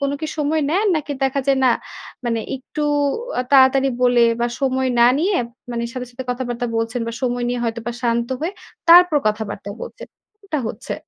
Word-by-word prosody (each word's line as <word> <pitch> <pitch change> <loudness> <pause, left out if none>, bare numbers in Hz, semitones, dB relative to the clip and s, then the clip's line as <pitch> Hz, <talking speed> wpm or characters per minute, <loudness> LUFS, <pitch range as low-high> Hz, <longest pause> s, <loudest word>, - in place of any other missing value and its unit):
কোনো 280 0 0
কি 315 - -2
সময় 300 +1 +1
নেন? 390 +7 +2
নাকি 295 -1 -3
দেখা 270 +1 +1
যায় 275 -1 +3
না 255 - +5 0.5
মানে 230 -2 0 0.2
একটু 270 +3 -6 0.6
আ - - 0
তাড়াতাড়ি 270 0 +6
বলে 245 -1 +4 0.2
বা 240 - +2
সময় 260 -1 +1
না 235 - +8
নিয়ে 370 +4 +1 0.3
মানে 235 -1 -2
সাথে, 255 -1 -5
সাথে 255 +2 -7
কথাবার্তা 245 -1 -3
বলছেন 225 +2 -1
বা 230 - -3
সময় 245 -1 0
নিয়ে 245 0 -2
হয়তোবা 235 +1 -3
শান্ত 235 0 0
হয়ে 335 +4 -2 0.4
তারপর 350 -1 +8
কথাবার্তা 210 -1 -2
বলছেন, - - -8 0.4
এটা 315 -6 -2
হচ্ছে? 230 +5 -6
255 Hz, 180 wpm, -20 LUFS, 235-285 Hz, 0.6 s, না